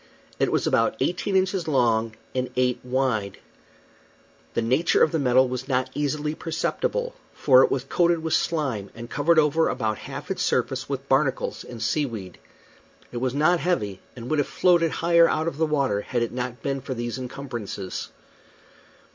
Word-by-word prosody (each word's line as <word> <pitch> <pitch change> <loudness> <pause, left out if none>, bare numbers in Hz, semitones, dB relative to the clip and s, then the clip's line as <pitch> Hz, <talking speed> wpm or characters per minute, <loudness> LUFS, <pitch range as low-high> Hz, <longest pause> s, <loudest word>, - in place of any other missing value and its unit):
It - - +2
was - - +1
about 115 - +2
eighteen 180 +7 -1
inches 185 -2 +1
long 115 -6 +2 0.2
and 130 -1 -1
eight 125 -1 +1
wide. 125 -6 -1 1.2
The - - +2
nature 130 +9 +3
of - - +3
the 160 - 0
metal 130 -1 +4
was 125 +1 -5
not 130 -2 0
easily 150 +1 -1
perceptible, 485 - -2 0.2
for 130 -3 +6
it - - +3
was 130 - -1
coated 170 +3 +1
with 160 -1 -1
slime, 135 -15 0
and 115 +1 -9
covered 160 +4 +2
over 155 +1 +3
about 110 -1 -2
half - - -7
its - - -2
surface 130 0 0
with 135 -1 -4
barnacles 135 -1 0
and 115 -2 -7
sea 140 +6 +1
weed. 105 -6 -8 0.7
It 120 - -5
was 130 +1 -1
not 160 +4 +3
heavy, 105 - -1 0.2
and 120 -1 -8
would 155 +2 +1
have 145 - +1
floated 175 -2 +3
higher 170 +1 +4
out 155 +1 0
of 165 - -3
the 160 0 +1
water 135 -9 +1
had 120 +2 -1
it 115 - -3
not 125 0 -5
been 135 -1 -2
for 130 - -5
these 120 +1 -4
encumbrances. 120 -7 -6
135 Hz, 175 wpm, -25 LUFS, 120-160 Hz, 1.2 s, for